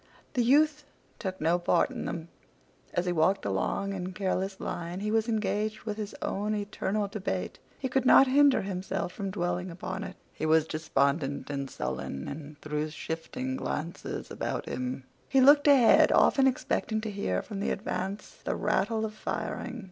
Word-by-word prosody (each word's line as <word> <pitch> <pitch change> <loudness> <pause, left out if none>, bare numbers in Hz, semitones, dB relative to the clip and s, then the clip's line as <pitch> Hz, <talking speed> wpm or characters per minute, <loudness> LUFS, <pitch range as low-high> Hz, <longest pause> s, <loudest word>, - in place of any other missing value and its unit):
The 250 - +2
youth 300 +4 +4 0.4
took 190 -3 -4
no 165 +3 +2
part 175 - +2
in - - -5
them. 165 0 -5 0.6
As 175 - 0
he 180 - +1
walked 175 +4 +2
along 200 0 -1
in 185 -1 -4
careless 190 0 -2
line 175 +2 -4
he 210 +1 -1
was 225 +1 +1
engaged 215 -1 -1
with 215 -2 -4
his 210 -1 -5
own 210 +2 -1
eternal 205 0 -1
debate. 200 0 -3 0.2
He 265 - -2
could 260 0 +1
not 265 +1 +8
hinder 275 -1 +5
himself 190 -1 -3
from 195 -2 -4
dwelling 180 0 -2
upon 185 +3 -5
it. - - -7 0.2
He 155 - -2
was 160 0 +4
despondent 145 -2 0
and 140 -1 -3
sullen, 70 - -4
and 145 0 -8
threw 150 0 -2
shifting 165 - -4
glances 170 -8 -4
about - - -3
him. 125 +1 -4 0.3
He 270 - +4
looked 285 +3 +7
ahead, 270 -5 +7
often 270 -1 +5
expecting 235 -3 0
to 215 -1 -4
hear 145 - -1
from 205 -3 -6
the 200 - -1
advance 195 0 -4
the - - -1
rattle 215 +2 +1
of 215 - -5
firing. 245 +3 -4
195 Hz, 170 wpm, -29 LUFS, 170-220 Hz, 0.6 s, not